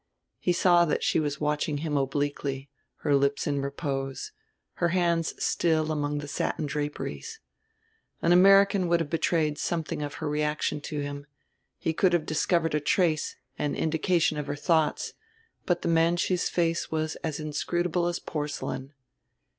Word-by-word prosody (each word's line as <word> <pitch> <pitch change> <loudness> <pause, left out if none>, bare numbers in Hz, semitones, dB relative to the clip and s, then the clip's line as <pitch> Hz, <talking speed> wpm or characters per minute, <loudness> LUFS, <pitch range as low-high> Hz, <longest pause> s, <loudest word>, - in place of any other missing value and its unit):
He 180 - +1
saw 175 0 +5
that 150 - -1
she - - +2
was 145 -2 -2
watching 150 0 0
him 150 -2 -1
obliquely, 140 0 -2 0.3
her 145 - +2
lips 140 0 +1
in 140 -1 0
repose, 140 - -3 0.5
her 175 - +4
hands 170 -2 +1
still 160 -2 +1
among 145 -1 -1
the 145 0 -5
satin 150 +2 -2
draperies. 150 - -4 0.8
An 170 - +2
American 195 +1 +6
would 170 0 +3
have 160 -3 -3
betrayed 160 -2 +1
something 160 -3 -2
of 145 0 -4
her 160 - -4
reaction 150 0 -1
to 150 0 -4
him, 145 0 -6 0.5
he 160 - -1
could 180 +2 +3
have 170 -3 +2
discovered 165 +1 +1
a 150 - +2
trace, 155 0 +1 0.2
an 145 -1 -1
indication, 160 0 +1
of 150 - -4
her 145 - -2
thoughts; 160 +1 +1 0.5
but 175 -1 +1
the - - -1
Manchu's 170 +2 +2
face 165 -1 0
was 155 0 -1
as 155 -2 -4
inscrutable 175 +3 -1
as 175 0 -1
porcelain. 145 -2 -4
155 Hz, 155 wpm, -27 LUFS, 145-170 Hz, 0.8 s, American